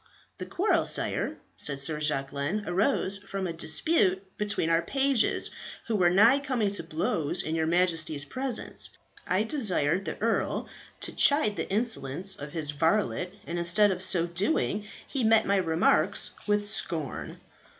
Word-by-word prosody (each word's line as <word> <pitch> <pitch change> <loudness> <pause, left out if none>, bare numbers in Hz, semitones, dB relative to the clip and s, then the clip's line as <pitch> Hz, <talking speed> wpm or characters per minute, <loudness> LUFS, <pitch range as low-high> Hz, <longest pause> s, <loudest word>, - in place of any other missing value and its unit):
"The - - -6
quarrel, 390 +5 +1
sire," - - -1 0.2
said 140 -2 -1
Sir 150 +2 0
Jacquelin, 145 +5 -1
"arose 195 +1 0
from 195 -1 -5
a 170 - -3
dispute 190 - +1
between 205 -5 -1
our 165 0 +3
pages, 270 +1 +1 0.3
who 225 - -1
were 180 -4 +4
nigh 225 +9 +5
coming 255 -8 -1
to 200 - -4
blows 165 +1 -1
in 155 - -3
your 160 -1 0
Majesty's 165 -4 0
presence. 255 - -2 0.4
I 185 +3 +2
desired 195 - +1
the - - -5
earl 225 +1 -1 0.3
to - - -2
chide 280 -8 +4
the - - -4
insolence 195 - -1
of 145 +1 -8
his 155 -3 +2
varlet, 180 +4 0
and 175 +1 -4
instead 190 +5 +4
of 180 -1 -3
so 185 -2 +2
doing 200 - -1 0.2
he 270 -3 -2
met 220 0 +4
my 200 0 +2
remarks 165 -2 +2 0.2
with 205 0 +1
scorn." 165 -8 -4
190 Hz, 150 wpm, -28 LUFS, 165-215 Hz, 0.4 s, nigh